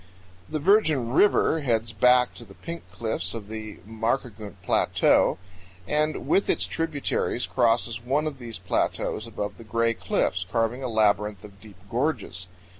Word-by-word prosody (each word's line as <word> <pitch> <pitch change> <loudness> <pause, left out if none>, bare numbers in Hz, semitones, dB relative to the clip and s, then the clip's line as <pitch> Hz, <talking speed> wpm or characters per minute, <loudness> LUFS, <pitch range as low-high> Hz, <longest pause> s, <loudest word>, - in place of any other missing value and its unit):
98 - - -15
The 155 - 0
Virgen 155 - +3
River 160 0 +4
heads 115 -5 0
back 125 +3 +4
in 120 - -12
the 95 - -15
Pink 170 0 -7
Cliffs 115 0 -2
of 105 -3 -7
the 110 -1 -6
Markagunt 110 -2 -3
Plateau - - +3 0.5
and 155 +1 0
with 200 - +2
its - - +2
tributaries 150 -6 -1
crosses 115 -1 +1
one 140 +5 0
of 145 -4 -4
these 115 -3 -6
plateaus 90 0 -1
above 105 +2 -5
the - - -9
Gray 115 +1 +1
Cliffs, 95 -3 -1
carving 115 +6 -1
a 130 - -3
labyrinth 105 -2 +1
of 100 -2 -14
deep 105 -3 -14
gorges. 115 - -2
115 Hz, 155 wpm, -26 LUFS, 110-135 Hz, 0.5 s, River